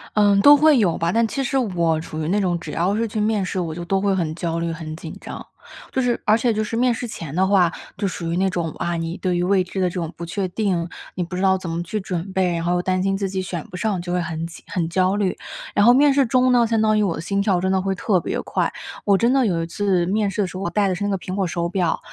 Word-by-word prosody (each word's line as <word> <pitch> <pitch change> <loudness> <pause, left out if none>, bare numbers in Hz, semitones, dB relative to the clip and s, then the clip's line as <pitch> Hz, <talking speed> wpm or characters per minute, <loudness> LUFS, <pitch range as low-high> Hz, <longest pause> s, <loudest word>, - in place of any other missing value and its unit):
嗯， 205 -1 +4
都 290 +5 +9
会 300 -1 +5
有 185 -7 +2
吧， 165 +1 0
但 230 +3 +2
其 275 +4 -2
实 270 +1 0
我 170 -9 +1
处 155 -1 -7
于 155 - -2
那 205 +4 +1
种， 175 -3 0
只 - - -9
要 185 +5 0
是 230 +1 0
去 215 0 -4
面 210 -1 +1
试， 185 0 -2
我 165 -3 -2
就 175 +2 -6
都 190 +3 0
会 200 0 +1
很 160 -4 -1
焦 170 -1 -2
虑、 170 0 -2
很 160 -1 -6
紧 160 -1 -8
张。 - - -8 0.5
就 260 - 0
是 245 -2 0
而 215 +1 +5
且 235 0 +1
就 215 - -1
是 220 - -4
面 250 0 +3
试 240 +1 -4
前 165 -10 -7
的 185 +3 +2
话， 185 -4 +4 0.3
就 200 - -1
属 170 -2 -4
于 170 - -1
那 190 +1 +2
种， 170 -3 -2
啊， 175 0 -2
你 165 +2 -3
对 180 -2 -1
于 175 - 0
未 185 0 +3
知 190 +1 -4
的 180 - +2
这 - - -10
种 165 -2 -3
不 170 - -8
确 185 +3 -2
定， 185 -4 -1 0.3
你 180 - -1
不 180 +1 -6
知 185 - -2
道 190 -1 +4
怎 185 -2 -7
么 165 +1 -2
去 210 +5 -3
准 185 0 -4
备， 185 -2 +1
然 165 0 -2
后 175 - +1
又 180 - +1
担 185 0 0
心 195 0 0
自 195 -1 -1
己 190 0 -3
选 175 -3 -5
不 180 - -7
上 210 -4 -1
就 175 0 -3
会 180 - +1
很 165 -1 -4
紧 165 - -10
很 175 -4 -1
焦 185 +3 +1
虑。 200 -3 0 0.4
然 205 - +3
后 240 - +7
面 285 +1 +5
试 275 -3 +3
中 255 +1 +3
呢， 240 -2 +4
相 225 0 +1
当 215 0 +3
于 - - +3
我 195 -5 +1
的 - - -5
心 200 +4 -1
跳 195 -3 +2
真 190 +1 0
的 190 0 +2
会 195 0 -1
特 185 0 +1
别 - - -3
快。 - - -1 0.3
我 200 -1 +4
真 235 +5 +2
的 270 - +3
有 165 -3 0
一 - - -2
次 185 0 0
面 205 +2 +1
试 195 +2 -2
的 190 - 0
时 180 - -10
候， 190 - -5
我 170 - -1
戴 205 +1 +1
的 190 - 0
是 190 +3 -4
那 205 - 0
个 195 - 0
苹 185 0 -7
果 195 -2 0
手 170 0 -2
表， 180 -3 0
190 Hz, 335 characters per minute, -22 LUFS, 170-210 Hz, 0.5 s, 都